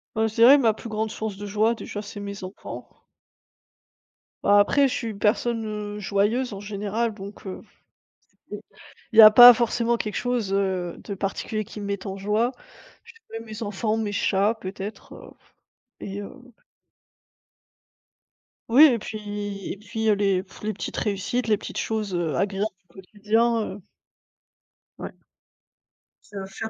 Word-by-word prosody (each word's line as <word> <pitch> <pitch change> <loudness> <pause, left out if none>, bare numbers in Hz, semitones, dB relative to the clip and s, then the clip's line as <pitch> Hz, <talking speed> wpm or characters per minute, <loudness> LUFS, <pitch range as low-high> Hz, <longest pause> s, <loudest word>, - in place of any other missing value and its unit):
Heu, 220 - +1
je 220 - -7
dirais 245 +5 +8
ma 230 -5 +3
plus 230 - -9
grande 220 +1 -2
source 215 -2 -5
de 205 - -7
joie, 215 +3 +1
déjà, 205 -2 -7
c'est 205 0 -9
mes 200 -1 -7
enfants. 185 +2 -8 1.6
Bah, 205 0 +5
après 280 +7 +4
je 260 - -3
suis 230 - -3
une 200 - -8
personne, 225 +2 0 0.3
heu, - - -7
joyeuse 210 +5 0
en 195 - -7
général, 210 +2 -3
donc, 200 0 -11
heu, 190 - -7 0.9
c'est - - -6 0.5
il 220 - +4
y - - +14
a 215 - +12
pas 245 +3 +10
forcément 235 0 0
quelque 210 -3 -4
chose, 240 -6 -1
heu, 190 -3 -1
de 200 - -5
particulier 200 +2 -3
qui 210 - -10
me 205 - -6
mette 200 -1 -4
en 195 - -5
joie. 210 +5 0 0.5
Je - - -15 0.2
dirais 225 0 -7
mes 220 0 -9
enfants, 215 +1 -2
mes 215 -2 -2
chats 205 +2 +1
peut-être, 195 +2 -8
heu, - - -12 0.7
et 200 +1 -6
heu 200 - -8 2.4
Oui 255 +7 +7
et 250 -6 +3
puis 205 -2 -6
et - - -6
puis 220 +2 -4
heu, - - +5
les, 195 -2 +1
pff, 190 - -17
les 215 +1 -2
petites - - -6
réussites, 210 +4 -2
les 215 -1 +3
petites - - -8
choses, 215 -4 -2
heu, 165 -5 -1
agréables 200 +5 -1 0.2
du - - -25
quotidien, 220 +4 0 0.2
heu - - -15 1.2
Ouais. - - -6 1.2
Heu 195 -1 -5
faire 195 +3 -6
210 Hz, 165 wpm, -24 LUFS, 200-225 Hz, 2.4 s, y